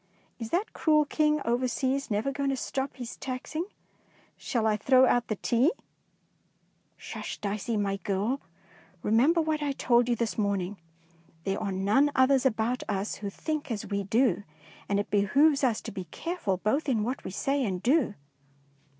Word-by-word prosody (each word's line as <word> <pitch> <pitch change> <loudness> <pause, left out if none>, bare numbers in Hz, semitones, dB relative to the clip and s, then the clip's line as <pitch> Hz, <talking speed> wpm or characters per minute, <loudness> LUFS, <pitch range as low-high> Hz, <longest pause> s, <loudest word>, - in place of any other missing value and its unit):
Is 225 -2 -5
that 370 - -1
cruel 305 -2 +3
King 300 0 +1
over 240 +2 +1
seas 265 +2 -1
never 215 +5 0
going 280 0 -1
to 270 - +1
stop 270 +1 -3
his 245 -2 -7
taxing? 270 +6 -4 0.7
Shall 230 -3 -2
I 215 -1 +3
throw 255 +5 +5
out 245 -1 +2
the 215 - -1
tea? 240 - +2 0.7
" - - -42
"S'hush, - - -6
Dicey, 210 +2 -2
my 200 -1 0
girl. 205 +7 -1 0.6
Remem 240 +10 +4
ber 335 - +3
what 310 -1 -1
I 285 -1 0
told 245 -2 +3
you 240 - +3
this 230 -1 -2
morning. 200 -1 -1 0.7
There 195 +2 -2
are 200 - -2
none 205 +10 +3
others 265 0 +4
about 235 +1 -1
us 200 0 -2
who 200 -1 -4
think 305 +7 -4
as 220 -4 -3
we 200 0 0
do, 220 -1 +2 0.5
and 200 0 +2
it 205 - -3
behoves 275 +9 +4
us 240 -5 +2
to - - -7
be 190 -2 -6
careful 210 - -3
both 270 - 0
in 225 -5 +1
what 250 +5 -3
we - - -5
say 275 +8 0
and 190 -4 -2
do. 265 -4 +2
240 Hz, 175 wpm, -28 LUFS, 205-275 Hz, 0.7 s, throw